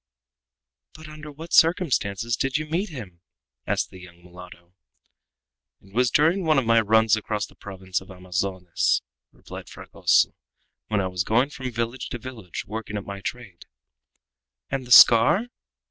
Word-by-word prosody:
"But 155 Hz, 0 st, -12 dB
under 155 Hz, 0 st, -10 dB
what 160 Hz, +4 st, -10 dB
circumstances 120 Hz, -, +2 dB
did 135 Hz, +2 st, -1 dB
you 155 Hz, -, -4 dB
meet 175 Hz, +7 st, -2 dB
him?" 100 Hz, -, -10 dB, 0.5 s
asked -, -, -1 dB
the 95 Hz, -, -12 dB
young 85 Hz, -1 st, -15 dB
mulatto. 90 Hz, 0 st, -14 dB, 1.1 s
"It 95 Hz, 0 st, -21 dB
was 125 Hz, +2 st, +2 dB
during 165 Hz, +8 st, +2 dB
one 155 Hz, -3 st, +2 dB
of 135 Hz, -, +1 dB
my 115 Hz, 0 st, +4 dB
runs 110 Hz, 0 st, +3 dB
across 105 Hz, -1 st, -3 dB
the -, -, -19 dB
province 95 Hz, -2 st, -5 dB
of 95 Hz, -, -16 dB
Amazones," 90 Hz, -1 st, -1 dB, 0.3 s
replied -, -, -11 dB
Fragoso, -, -, +1 dB, 0.5 s
"when 105 Hz, -2 st, 0 dB
I 95 Hz, -, -1 dB
was 90 Hz, -1 st, -2 dB
going 120 Hz, +8 st, +1 dB
from 130 Hz, -1 st, -6 dB
village 120 Hz, +2 st, -4 dB
to -, -, -5 dB
village, 115 Hz, -8 st, -8 dB
working 110 Hz, 0 st, -6 dB
at 100 Hz, -, -6 dB
my 100 Hz, 0 st, -7 dB
trade." 110 Hz, -6 st, -8 dB, 1.0 s
"And 135 Hz, -2 st, -3 dB
the -, -, -11 dB
scar?" 125 Hz, -, +7 dB
115 Hz, 155 wpm, -24 LUFS, 95-135 Hz, 1.1 s, scar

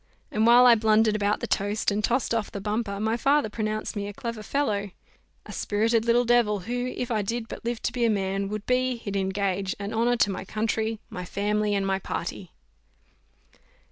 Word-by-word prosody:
and 215 Hz, +2 st, +2 dB
while 245 Hz, +1 st, +8 dB
I 245 Hz, -, +9 dB
blundered 215 Hz, -1 st, +3 dB
out 205 Hz, +1 st, +1 dB
the -, -, -1 dB
toast, 205 Hz, +2 st, 0 dB
and 210 Hz, +1 st, -1 dB
tossed 240 Hz, +2 st, +1 dB
off 225 Hz, -3 st, -1 dB
the 200 Hz, -, -5 dB
bumper, 210 Hz, 0 st, -2 dB
my 220 Hz, +2 st, 0 dB
father 280 Hz, -1 st, +2 dB
pronounced 215 Hz, 0 st, -3 dB
me 200 Hz, -1 st, -3 dB
a 205 Hz, -, -6 dB
clever 230 Hz, +1 st, -5 dB
fellow, 210 Hz, -5 st, -1 dB, 0.6 s
"a -, -, -9 dB
spirited 225 Hz, +2 st, +1 dB
little 240 Hz, +1 st, +3 dB
devil, 230 Hz, -4 st, +3 dB
who, 245 Hz, +5 st, -3 dB
if 250 Hz, -1 st, -3 dB
I 215 Hz, -2 st, +1 dB
did 230 Hz, +3 st, -3 dB
but -, -, -8 dB
live 235 Hz, 0 st, -3 dB
to -, -, 0 dB
be 245 Hz, -1 st, -2 dB
a 230 Hz, -, +4 dB
man, 195 Hz, -1 st, -1 dB
would 210 Hz, 0 st, -5 dB
be, 255 Hz, 0 st, +1 dB
he'd 205 Hz, -4 st, -6 dB
engage, 195 Hz, 0 st, -1 dB
an 200 Hz, +1 st, -5 dB
honour 235 Hz, +2 st, +2 dB
to 205 Hz, -, +3 dB
my 185 Hz, -, -5 dB
country, 220 Hz, +2 st, -2 dB
my 180 Hz, -, -5 dB
family, 205 Hz, +3 st, 0 dB
and 195 Hz, -1 st, 0 dB
my 195 Hz, 0 st, 0 dB
party." -, -, -5 dB
215 Hz, 205 wpm, -26 LUFS, 200-235 Hz, 0.6 s, I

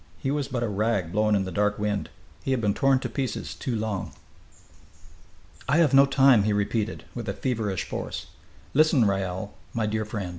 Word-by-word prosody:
He 135 Hz, -, -2 dB
was 145 Hz, -2 st, -1 dB
but 125 Hz, -3 st, -2 dB
a -, -, 0 dB
rag 105 Hz, -4 st, 0 dB
blown 105 Hz, +1 st, +2 dB
in 100 Hz, -, +1 dB
the 95 Hz, -, -5 dB
dark 105 Hz, +1 st, +1 dB
wind. 105 Hz, -1 st, -2 dB, 0.3 s
He -, -, -4 dB
had 130 Hz, -2 st, +2 dB
been 105 Hz, -3 st, +1 dB
torn 135 Hz, +4 st, +3 dB
to 125 Hz, -, -2 dB
pieces 125 Hz, -1 st, -3 dB
too 125 Hz, -, -3 dB
long. 105 Hz, -3 st, -3 dB, 1.6 s
"I 145 Hz, -, +4 dB
have 165 Hz, -6 st, +4 dB
no 140 Hz, +1 st, +7 dB
time!" 135 Hz, -4 st, +5 dB
he 105 Hz, +1 st, +1 dB
repeated, 105 Hz, +1 st, -1 dB
with -, -, -5 dB
a -, -, -1 dB
feverish 110 Hz, -8 st, -2 dB
force. -, -, -5 dB, 0.5 s
"Listen, 155 Hz, -4 st, +4 dB
Raoul, 95 Hz, 0 st, -2 dB, 0.2 s
my 115 Hz, -2 st, +1 dB
dear 110 Hz, +1 st, -1 dB
friend. 105 Hz, -4 st, -4 dB
110 Hz, 190 wpm, -26 LUFS, 105-130 Hz, 1.6 s, no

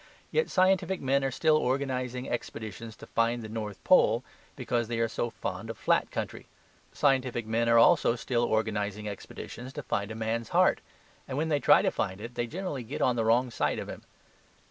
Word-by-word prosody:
Yet 475 Hz, 0 st, +1 dB
scientific 190 Hz, 0 st, +2 dB
men 135 Hz, +1 st, +1 dB
are 135 Hz, -, +1 dB
still 155 Hz, +4 st, +3 dB
organizing 130 Hz, -2 st, -1 dB
expeditions 110 Hz, -1 st, -5 dB
to -, -, -12 dB
find 115 Hz, +1 st, 0 dB
the -, -, -6 dB
North 105 Hz, -3 st, -6 dB
Pole, -, -, +4 dB, 0.3 s
because 120 Hz, -2 st, -1 dB
they 120 Hz, 0 st, -3 dB
are 115 Hz, 0 st, +2 dB
so 120 Hz, +1 st, -2 dB
fond 115 Hz, -, -5 dB
of -, -, -5 dB
flat -, -, +2 dB
country. -, -, -5 dB, 0.4 s
Scientific 125 Hz, -4 st, +1 dB
men 115 Hz, +1 st, +1 dB
are 115 Hz, -, +6 dB
also 115 Hz, 0 st, +5 dB
still 120 Hz, 0 st, -1 dB
organizing 105 Hz, -2 st, -1 dB
expeditions 120 Hz, +5 st, -8 dB
to 150 Hz, -, -6 dB
find 100 Hz, -3 st, -2 dB
a 110 Hz, -, -6 dB
man's 115 Hz, 0 st, -2 dB
heart; -, -, +3 dB, 0.5 s
and 130 Hz, -, -4 dB
when 160 Hz, +2 st, 0 dB
they 145 Hz, -2 st, +2 dB
try -, -, +5 dB
to -, -, +2 dB
find 95 Hz, +1 st, -2 dB
it, 115 Hz, +3 st, -7 dB
they 120 Hz, 0 st, -2 dB
generally 170 Hz, -2 st, -4 dB
get 120 Hz, +5 st, -4 dB
on 125 Hz, -, +3 dB
the 115 Hz, -, 0 dB
wrong 120 Hz, +2 st, +3 dB
side -, -, 0 dB
of -, -, -5 dB
him. -, -, -7 dB
120 Hz, 195 wpm, -29 LUFS, 110-135 Hz, 0.5 s, are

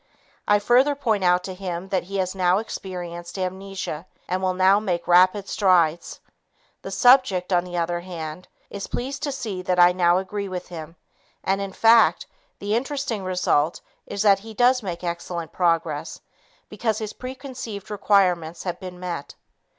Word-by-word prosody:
I 205 Hz, -, +5 dB
further 250 Hz, +7 st, +3 dB
point 220 Hz, -8 st, 0 dB
out 180 Hz, 0 st, +3 dB
to 190 Hz, -, -5 dB
him 180 Hz, -1 st, -5 dB
that 190 Hz, -2 st, -1 dB
he 195 Hz, +2 st, -5 dB
has 185 Hz, -1 st, -1 dB
now 185 Hz, -1 st, +2 dB
experienced 175 Hz, -5 st, -6 dB
amnesia 185 Hz, -3 st, -4 dB, 0.2 s
and 185 Hz, +1 st, -1 dB
will 185 Hz, -1 st, 0 dB
now 190 Hz, +2 st, +5 dB
make 180 Hz, -5 st, -2 dB
rapid 185 Hz, +3 st, +4 dB
strides. 175 Hz, -4 st, +2 dB, 0.6 s
The -, -, -7 dB
subject, 245 Hz, -8 st, +4 dB
on 175 Hz, 0 st, +2 dB
the 175 Hz, -1 st, -5 dB
other 170 Hz, 0 st, -1 dB
hand, 175 Hz, -1 st, -7 dB, 0.2 s
is 200 Hz, -1 st, -5 dB
pleased 270 Hz, +3 st, -4 dB
to 285 Hz, -, -2 dB
see 220 Hz, -9 st, -4 dB
that 180 Hz, 0 st, 0 dB
I 175 Hz, 0 st, +8 dB
now 175 Hz, -1 st, +3 dB
agree 200 Hz, +1 st, -3 dB
with 180 Hz, -1 st, -6 dB
him, 165 Hz, -1 st, -8 dB, 0.5 s
and, 195 Hz, +1 st, 0 dB
in 195 Hz, -1 st, -4 dB
fact, 225 Hz, +3 st, +5 dB, 0.3 s
the 205 Hz, +1 st, -3 dB
interesting 270 Hz, -4 st, -2 dB
result 180 Hz, -4 st, +1 dB, 0.3 s
is 200 Hz, -, -2 dB
that 200 Hz, -2 st, +5 dB
he 220 Hz, +2 st, -11 dB
does 250 Hz, +2 st, +4 dB
make 180 Hz, -4 st, -5 dB
excellent 170 Hz, -1 st, -4 dB
progress 165 Hz, -4 st, -1 dB, 0.5 s
because 215 Hz, 0 st, -2 dB
his 215 Hz, -1 st, -5 dB
preconceived 255 Hz, -6 st, -7 dB
requirements 180 Hz, -5 st, +1 dB
have 175 Hz, -1 st, -4 dB
been 180 Hz, -2 st, -8 dB
met. 175 Hz, -5 st, -5 dB
185 Hz, 165 wpm, -23 LUFS, 175-210 Hz, 0.6 s, I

